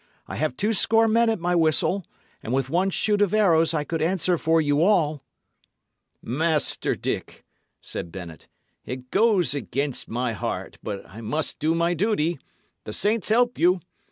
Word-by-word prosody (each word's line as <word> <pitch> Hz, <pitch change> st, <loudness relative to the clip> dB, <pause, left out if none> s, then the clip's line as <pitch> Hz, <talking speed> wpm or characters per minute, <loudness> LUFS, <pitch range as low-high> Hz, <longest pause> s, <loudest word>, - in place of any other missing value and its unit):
I -, -, -6 dB
have 150 Hz, -4 st, -1 dB
two 210 Hz, +3 st, +1 dB
score 225 Hz, +2 st, +3 dB
men 230 Hz, +1 st, +3 dB
at 225 Hz, -, 0 dB
my 175 Hz, +1 st, 0 dB
whistle, 170 Hz, +3 st, +1 dB, 0.3 s
and 115 Hz, -, -6 dB
with 135 Hz, 0 st, 0 dB
one 185 Hz, +3 st, +2 dB
shoot 205 Hz, +2 st, +1 dB
of 205 Hz, 0 st, +2 dB
arrows 165 Hz, -6 st, +4 dB
I 150 Hz, -, 0 dB
could 165 Hz, +2 st, -3 dB
answer 180 Hz, +2 st, +1 dB
for 160 Hz, 0 st, +2 dB
you 145 Hz, -1 st, +2 dB
all." 155 Hz, -7 st, +2 dB, 1.0 s
"Master 155 Hz, +4 st, 0 dB
Dick," -, -, -5 dB, 0.4 s
said 85 Hz, -, -6 dB
Bennet, 85 Hz, -4 st, -9 dB, 0.4 s
"it 125 Hz, 0 st, -7 dB
goes 195 Hz, -, +3 dB
against 140 Hz, -1 st, -3 dB
my 120 Hz, 0 st, -1 dB
heart; 100 Hz, -, -5 dB
but 100 Hz, -2 st, -6 dB
I 110 Hz, -, -11 dB
must 150 Hz, +8 st, -2 dB
do 160 Hz, +2 st, +1 dB
my 170 Hz, +1 st, +1 dB
duty. 175 Hz, -4 st, 0 dB, 0.5 s
The 105 Hz, -, -6 dB
saints 215 Hz, -, 0 dB
help 245 Hz, +2 st, +2 dB
you!" 180 Hz, +2 st, +4 dB
165 Hz, 165 wpm, -24 LUFS, 140-195 Hz, 1.0 s, arrows